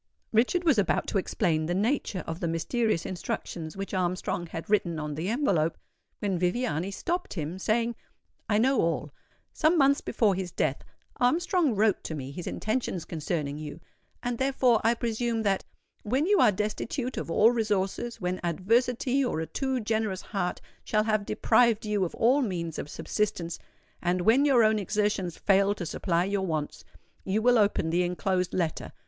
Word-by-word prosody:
Richard 250 +11 +3
was 305 -10 +4
about 195 - +1
to 200 - +1
explain 160 -5 0
the 175 - 0
nature 210 -2 0
of 165 +1 -5
the 170 - -1
mysterious 170 +4 0
instructions 170 -2 -5
which 195 +1 -5
Armstrong 180 -1 -1
had 165 0 -7
written 185 -6 +1
on 150 -1 -4
the 160 +6 -3
envelope, 195 - +1 0.4
when 195 -4 -1
Viviani 180 -2 0
stopped 345 - -3
him, 165 +2 -4
saying, 230 +4 0 0.5
"I 210 - +3
know 260 +4 +3
all. 155 -3 -1 0.4
Some 325 +2 +3
months 280 -1 +4
before 210 -4 +2
his 185 -1 -3
death 140 -4 -1 0.3
Armstrong 320 - +2
wrote 210 0 +2
to 160 - -3
me 135 -2 -6
his 170 +4 -7
intentions 215 -6 -2
concerning 150 -3 -3
you; 155 +1 -7 0.4
and 245 -1 -2
therefore, 260 -4 +3
I 230 +1 +3
presume 230 0 -1
that 195 -2 +1 0.4
'_when 260 +8 +1
you 410 -1 +4
are - - +6
destitute 225 +6 -3
of - - -4
all 215 +7 +5
resources—when 205 -3 -1
adversity 240 - +1
or 245 -10 -1
a 160 - -2
too 260 - -2
generous 220 -3 -1
heart 195 -4 -3 0.2
shall 215 0 +1
have 215 -2 0
deprived 225 0 +3
you 210 -2 0
of 170 - -6
all 255 +5 +3
means 170 - -3
of - - -5
subsistence—and 180 -1 -3
when 235 +9 +4
your 260 -5 +5
own 215 0 +3
exertions 200 -3 -1
fail 200 0 +3
to 180 - -5
supply 170 +1 0
your 195 -1 -1
wants, 155 -3 -3 0.4
you 195 +3 0
will 245 +1 +4
open 200 -6 +2
the 175 +2 +2
enclosed 180 +1 -1
letter. 165 -4 -2
205 Hz, 165 wpm, -28 LUFS, 175-235 Hz, 0.5 s, are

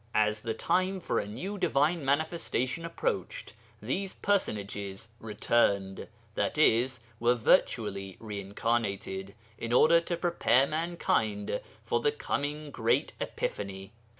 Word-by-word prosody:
As 105 0 +2
the 115 -1 -2
time 185 +8 +1
for - - 0
a - - -3
new 190 - -5
divine 165 -1 +2
manifestation 155 0 0
approached, - - -3 0.3
these 195 -1 -2
personages 100 - -1
'returned,' 100 -3 +1 0.3
i.e. 125 -5 +3 0.3
were 120 +1 +4
virtually 100 -4 +1
re 105 -3 -5
incarnated, 100 -2 -2 0.2
in 115 - -3
order 165 +7 +6
to 170 0 -3
prepare 165 -7 +3
mankind 140 -11 -1 0.2
for 120 0 +1
the 145 - +2
coming 150 0 -3
great - - +1
epiphany. 95 -1 -4
120 Hz, 115 wpm, -30 LUFS, 105-165 Hz, 0.3 s, order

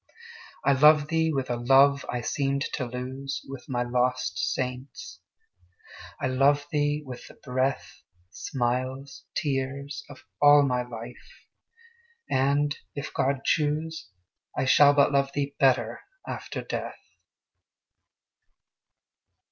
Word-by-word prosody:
I - - +5
love 150 +2 +5
thee 160 -1 +1
with 135 -4 -2
a 120 - -1
love 135 +3 +4
I 125 - -2
seemed 140 +3 -1
to 130 - -2
lose 130 +3 -5
With 135 -2 -9
my 120 -2 0
lost 125 +1 0
saints, 125 0 -4 1.0
I - - -2
love 140 +3 +3
thee 145 0 0
with 125 -2 -9
the - - -15
breath, 130 +1 -2 0.3
Smiles, 130 +5 -3
tears, 140 0 -3
of 145 - -13 0.2
all 145 0 +7
my 125 -3 +1
life! 120 0 -10 0.8
and, 145 +2 +1 0.2
if 140 0 -6
God 135 0 0
choose, 155 -4 -1 0.5
I - - +1
shall 145 +2 +6
but 140 0 +4
love 140 -1 +1
thee 140 0 -2
better 120 -4 +2 0.3
after - - -5
death. - - -5
135 Hz, 115 wpm, -26 LUFS, 125-145 Hz, 1.0 s, all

